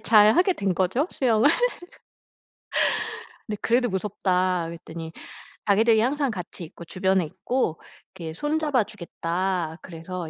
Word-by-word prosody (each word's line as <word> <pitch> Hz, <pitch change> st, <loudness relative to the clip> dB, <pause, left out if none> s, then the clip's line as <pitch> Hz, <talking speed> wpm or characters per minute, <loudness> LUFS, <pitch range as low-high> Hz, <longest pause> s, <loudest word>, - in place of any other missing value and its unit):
잘하게 220 Hz, -, +6 dB
된 195 Hz, -, 0 dB
거죠 190 Hz, -, +1 dB
수영을. 240 Hz, 0 st, +3 dB, 2.0 s
"근데 210 Hz, -2 st, -4 dB
그래도 245 Hz, +1 st, +3 dB
무섭다." 185 Hz, -3 st, 0 dB
그랬더니 165 Hz, -1 st, -8 dB, 0.6 s
자기들이 220 Hz, +2 st, +5 dB
항상 275 Hz, +2 st, +1 dB
같이 180 Hz, -3 st, -7 dB
있고 170 Hz, +1 st, -12 dB
주변에 190 Hz, 0 st, +1 dB
있고 180 Hz, +2 st, -2 dB, 0.3 s
이렇게 160 Hz, -2 st, -6 dB
손 295 Hz, -, -1 dB
잡아 285 Hz, -7 st, +2 dB
주겠다. 175 Hz, -3 st, -3 dB
그래서 170 Hz, 0 st, -6 dB
190 Hz, 280 characters per minute, -25 LUFS, 170-230 Hz, 2.0 s, 잘하게